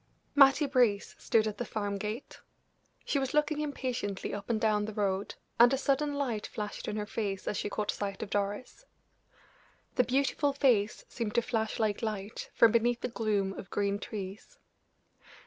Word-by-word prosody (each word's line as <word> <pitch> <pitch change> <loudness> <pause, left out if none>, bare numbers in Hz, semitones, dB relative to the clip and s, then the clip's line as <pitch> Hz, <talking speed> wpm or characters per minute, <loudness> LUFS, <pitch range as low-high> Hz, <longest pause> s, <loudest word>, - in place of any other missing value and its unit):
Mattie 280 +1 +6
Brace 245 -7 +2
stood 220 -1 +2
at 215 -1 -3
the - - 0
farm 205 -3 -3
gate: 215 +6 -5 0.7
she 280 - +1
was 270 +1 -2
looking 300 0 +2
impatiently 250 -9 -3
up 205 +2 -6
and 225 -2 +1
down 215 -2 +2
the 215 -1 -6
road, 200 -1 -1 0.2
and 240 +1 +8
a 270 - +2
sudden 285 +2 +1
light 245 -7 -2
flashed 210 -1 -5
in - - -2
her 210 -1 -2
face 205 -3 -3
as - - 0
she 205 - -2
caught 210 0 -1
sight 200 0 -4
of 200 - -8
Doris. 205 - -3 1.1
The 250 - +6
beautiful 280 +3 +1
face 240 -7 +2
seemed 225 -3 -4
to 235 - +3
flash 225 -3 -1
like 215 -2 0
light 215 -2 -4
from 230 - +7
beneath 235 +1 +2
the - - -2
gloom 210 -4 0
of 190 - -9
green 200 0 0
trees. 205 - -7
220 Hz, 175 wpm, -31 LUFS, 205-255 Hz, 1.1 s, and